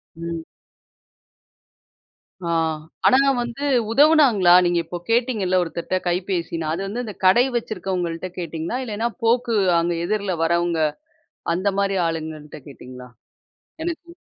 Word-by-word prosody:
ம். 165 -1 -5 2.0
ஆ - - -3 0.6
ஆனா 260 - +6 0.2
வந்து 240 +4 -4 0.3
உதவுனாங்களா? 270 - +5
நீங்க 175 0 +2
இப்ப 175 - -6
கேட்டீங்கல்ல 225 -6 +1
ஒருத்தர்ட்ட 170 +2 -3
கைபேசின்னு, 175 -2 -2
அது 165 +4 -2
வந்து 235 +5 -4
இந்த 210 - -6
கடை 235 +7 +6
வச்சிருக்கவங்கள்ட்ட 185 -6 -3
கேட்டீங்களா? 165 +5 -4
இல்லன்னா 225 +1 -2
போக்கு 235 0 +2 0.2
அங்க 170 +1 0
எதிர்ல 200 -2 -1
வரவங்க 170 0 +1 0.8
அந்தமாரி 195 +1 0
ஆளுங்கக்கிட்ட 155 -2 -5
கேட்டீங்களா? 125 -2 -11 0.8
எனக்கு 340 0 -6
185 Hz, 105 wpm, -22 LUFS, 170-230 Hz, 2.0 s, ஆனா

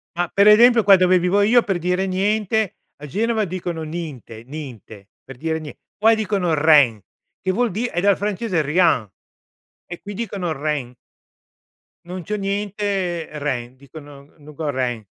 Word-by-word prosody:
Ma 175 0 0
per 200 +1 +4
esempio 230 +1 +7
qua 195 -1 +7
dove 185 0 +4
vivo 180 +3 +2
io, 230 +4 +4
per 195 -3 -2
dire 180 +2 0
"niente", 205 +2 0 0.2
a 150 +1 -10
Genova 220 - 0
dicono: 175 -2 -5
"Ninte, 155 -9 -7
ninte", 120 -8 -10 0.2
per 135 -2 -12
dire 160 +2 -2
nie 150 -2 -9 0.2
poi 225 +2 +4
dicono: 195 -5 -1
"Rein" 145 -8 +4 0.4
che 185 - 0
vuol 235 +2 0
di' 225 +6 -2
è 175 - -3
dal 200 +1 +3
francese 205 -3 -1
Rien; 150 - +2 0.8
e 175 - -9
qui 205 - -8
dicono: 195 -5 -4
"Rein." 145 -4 -3 1.1
Non 180 0 -7
c'ho 210 - -3
niente, 200 -3 -2
rein. 130 -3 -4
Dicono: 140 +1 -14
"no 150 0 -14
go 150 0 -4
rein." 125 -5 -2
175 Hz, 160 wpm, -21 LUFS, 145-205 Hz, 1.1 s, esempio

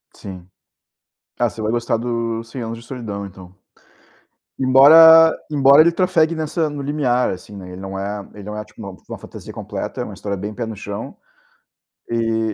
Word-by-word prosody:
Sim. 90 -3 -10 0.9
Ah, - - +1
você 110 - -9
vai 110 +1 -1
gostar 120 -1 -1
do 115 -1 -3
Cem 115 +3 -8
Anos 115 0 -5
de 115 - -13
Solidão, 105 -6 -6
então. 95 -1 -13 1.1
Embora 160 +5 +7
embora 140 0 +6
ele 170 +1 +3
trafegue 170 -3 +1
nessa 160 0 -2
no 145 -1 -6
limiar, 135 -4 0
assim, 95 +2 -8
né, 90 -1 -10
ele 90 - -9
não 95 0 -6
é 100 +1 -5
ele 100 -1 -11
não 105 0 -7
é, 105 - -5
tipo, 110 - -18
uma 100 -3 -8
uma - - -7
fantasia - - -11
completa, - - -6
é - - -2
uma - - -9
história 100 -1 -5
bem 105 +3 -6
pé 115 0 -4
no 110 - -7
chão. 105 +5 -7 0.9
E 115 -1 -1
115 Hz, 185 wpm, -20 LUFS, 100-140 Hz, 1.1 s, Embora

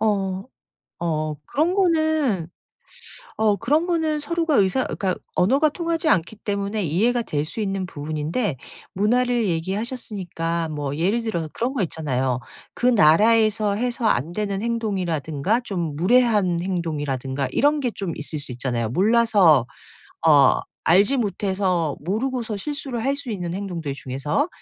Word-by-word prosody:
어. 195 -3 0 0.6
어 155 -2 -1
그런 325 +6 0
거는 315 - +1 0.9
어 215 -2 +3
그런 300 - +1
거는 320 -3 0
서로가 330 -1 0
의사 200 +7 +3
그러니까 190 -2 -1 0.2
언어가 275 +11 +3
통하지 335 -2 -2
않기 190 +3 +1
때문에 200 0 -2
이해가 230 +10 +1
될 150 -7 -2
수 220 - -5
있는 195 -2 -2
부분인데 155 - -3 0.4
문화를 240 +3 +1
얘기하셨으니까 180 -3 -3
뭐 145 -2 -3
예를 200 +8 +1
들어서 170 -8 -2
그런 245 +3 -1
거 245 -8 -1
있잖아요. 130 -6 -1 0.3
그 - - -6
나라에서 215 +1 +4
해서 240 0 -2
안 160 - +1
되는 200 -1 -2
행동이라든가 195 - -1
좀 170 -9 -3
무례한 205 -3 +3
행동이라든가 145 -7 -2
이런 295 +1 +2
게 250 -3 0
좀 190 -5 -3
있을 150 +1 -4
수 145 -3 -6
있잖아요 120 -2 -2
몰라서 195 - +4 0.6
어 145 -4 +6 0.3
알지 200 +11 +4
못해서 190 - 0
모르고서 225 - -2
실수를 260 0 -4
할 275 +1 +2
수 280 -4 -6
있는 180 -4 -3
행동들 175 -7 -4
중에서. 140 - -2
200 Hz, 310 characters per minute, -23 LUFS, 160-235 Hz, 0.9 s, 어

